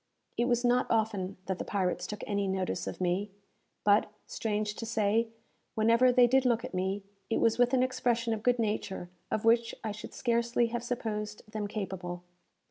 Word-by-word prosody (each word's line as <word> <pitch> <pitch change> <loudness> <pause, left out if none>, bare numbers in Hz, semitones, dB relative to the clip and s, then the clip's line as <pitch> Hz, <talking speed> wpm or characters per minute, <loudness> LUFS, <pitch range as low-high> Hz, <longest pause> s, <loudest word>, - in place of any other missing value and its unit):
It 240 - +1
was 245 0 +1
not 245 +1 +3
often 210 -4 0
that 190 -1 -2
the - - -2
pirates 185 -3 -1
took 210 - -6
any 200 -1 0
notice 190 -1 -2
of - - -5
me; 185 +3 0 0.5
but, 205 +1 +4 0.2
strange 210 -1 -2
to 230 - -4
say, 220 0 +2 0.5
whenever 230 +3 +5
they 250 0 +6
did 260 +2 +4
look 240 -1 +2
at - - -8
me, 190 +2 -1 0.3
it 225 - +1
was 230 0 +2
with 245 0 +4
an 255 -1 +3
expression 245 -3 0
of 215 - -3
good 245 +2 +3
nature 205 -5 -2 0.2
of 215 - -1
which 230 0 +3
I 220 - -2
should 210 +1 -8
scarcely 235 -1 +1
have 240 0 -2
supposed 215 -3 -3
them 215 -2 -3
capable. 185 -4 -5
220 Hz, 185 wpm, -30 LUFS, 205-235 Hz, 0.5 s, they